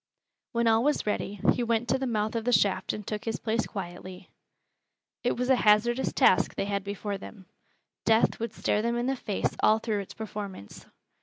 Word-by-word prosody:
When 235 0 +1
all 225 +1 +4
was 295 +2 +1
ready, 205 -1 -2
he - - -2
went 235 0 0
to - - +2
the 265 - -1
mouth 215 -2 -1
of 230 - -1
the 245 - +1
shaft 190 -3 +2
and 210 - -6
took 210 +1 -4
his 225 -1 -2
place 225 0 -1
quietly. 185 -1 -8 0.9
It 245 - 0
was 250 +1 -1
a - - +7
hazardous 240 +4 +3
task - - +3
they - - -1
had 200 -1 -2
before 200 0 -4
them. 190 -1 -11 0.6
Death 225 0 +3
would 230 +1 -3
stare 210 - +1
them 235 +1 0
in 240 - -1
the 270 +1 0
face 210 -5 -2
all 215 - +5
through 220 -2 -2
its 195 - -8
performance. 200 - -7
220 Hz, 200 wpm, -28 LUFS, 200-235 Hz, 0.9 s, a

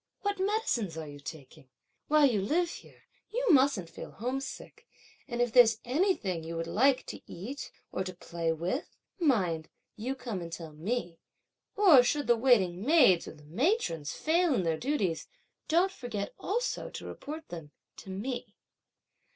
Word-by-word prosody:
What 405 -1 -1
medicines 375 - 0
are 160 -1 -5
you 145 0 -10
taking? 145 -1 -10 0.4
while 305 -1 +5
you 225 -7 +2
live 335 - +1
here, - - -13 0.3
you - - -1
mustn't 265 - +4
feel 165 - -9
homesick; 260 +5 -5 0.4
and 240 0 0
if 240 -2 -2
there's 230 -3 +7
anything 250 - 0
you 165 +1 -5
would 165 - -2
like 255 +10 +3
to - - -7
eat, 240 +11 -6 0.2
or 190 - -1
to 185 -1 -6
play 170 -2 -2
with, 175 - -3 0.2
mind 185 - +1 0.3
you 250 +5 -3
come 235 -8 -5
and 170 -1 -7
tell 165 -2 -7
me! 175 +1 -3 0.6
or 365 -11 +8
should 290 +4 0
the 240 - +5
waiting 210 -7 +3
maids 250 - +5
or - - -8
the 150 - -17
matrons 170 - 0
fail 330 -1 +2
in 190 - +1
their 165 -1 +1
duties, 200 - -1 0.4
don't 350 +4 +3
forget 220 - -5
also 475 +6 -2
to - - -8
report 310 +2 -7
them 165 -4 -7 0.3
to - - -11
me." 215 +2 -4
235 Hz, 160 wpm, -30 LUFS, -, 0.6 s, or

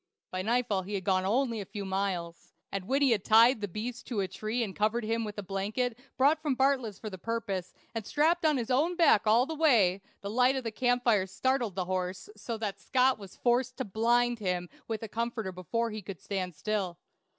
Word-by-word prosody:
By 185 - -2
nightfall 225 -1 +1
he 200 +3 -5
had 190 - -3
gone 185 0 +1
only 230 0 +1
a - - -6
few 200 0 -6
miles, 190 -3 -3 0.2
and 195 -2 -3
when 275 +3 +2
he 270 - +4
had 210 -4 +2
tied 230 +2 +6
the 205 - -1
beast 230 +6 -6
to 225 -5 -1
a 190 - -1
tree 215 +5 -2
and 195 -4 -5
covered 220 +3 +1
him 225 +1 -1
with 210 -1 -6
a 205 - -4
blanket 205 +6 -2 0.2
brought 290 +4 +4
from 295 -4 0
Bartlett's 260 -6 +1
for 215 0 -7
the 190 - -8
purpose, 195 -4 -3 0.2
and 225 -2 -3
strapped 320 - +2
on 305 -3 +3
his 240 0 -2
own 310 +8 +2
back 325 - +4
all 230 +4 +5
the 320 - -4
way, 230 - +3 0.2
the 200 - -5
light 250 +3 +4
of 265 - -2
the 225 - -3
camp 245 +2 +1
fire 210 -6 +3
startled 245 0 0
the 185 -2 -1
horse 185 +1 -3
so 225 +2 -5
that 210 -3 -4
Scott 255 -1 +2
was 195 -2 -11
forced 250 +1 +1
to 260 - -2
blind 235 +3 +2
him 180 -3 -2 0.2
with 225 -1 -3
a - - -4
comforter 225 -2 -3
before 225 +6 -2
he 215 -1 -6
would 195 -4 -6
stand 185 -4 -4
still. 195 -3 -2
220 Hz, 225 wpm, -30 LUFS, 195-245 Hz, 0.2 s, tied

